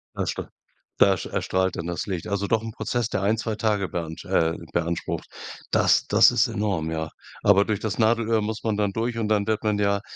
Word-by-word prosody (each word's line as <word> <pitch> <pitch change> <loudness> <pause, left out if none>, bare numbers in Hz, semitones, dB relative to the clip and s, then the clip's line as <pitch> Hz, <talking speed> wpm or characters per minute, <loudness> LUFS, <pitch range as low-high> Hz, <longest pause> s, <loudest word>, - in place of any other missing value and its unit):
Da - - -3
erstra - - -3 0.5
da 95 - +5 0.2
erstrahlt 95 -1 0
dann 85 - -4
das 85 - -3
Licht. 90 -5 -4
Also 100 0 -1
doch 110 -2 +2
'n 115 - -6
Prozess, 115 +1 -2
der 95 - -2
1, 110 +3 +2
2 110 -1 -2
Tage 105 -3 0
beansch 80 -2 -5
äh, 80 0 +2 0.2
beansprucht. 85 0 -2 0.5
Das - - +4
das - - +7
ist 120 +4 +3
enorm, 100 -8 -1
ja. 80 -1 -3 0.3
Aber 100 0 +5
durch 105 -2 -1
das 110 -1 -3
Nadelöhr 115 0 +2
muss 110 +1 -4
man 110 -2 0
dann 105 -1 +1
durch 115 +3 -2
und 110 -2 -1
dann 105 -1 +1
wird 110 -1 0
man 105 -1 +1
ja, 100 -1 +1
105 Hz, 215 wpm, -25 LUFS, 95-110 Hz, 0.5 s, das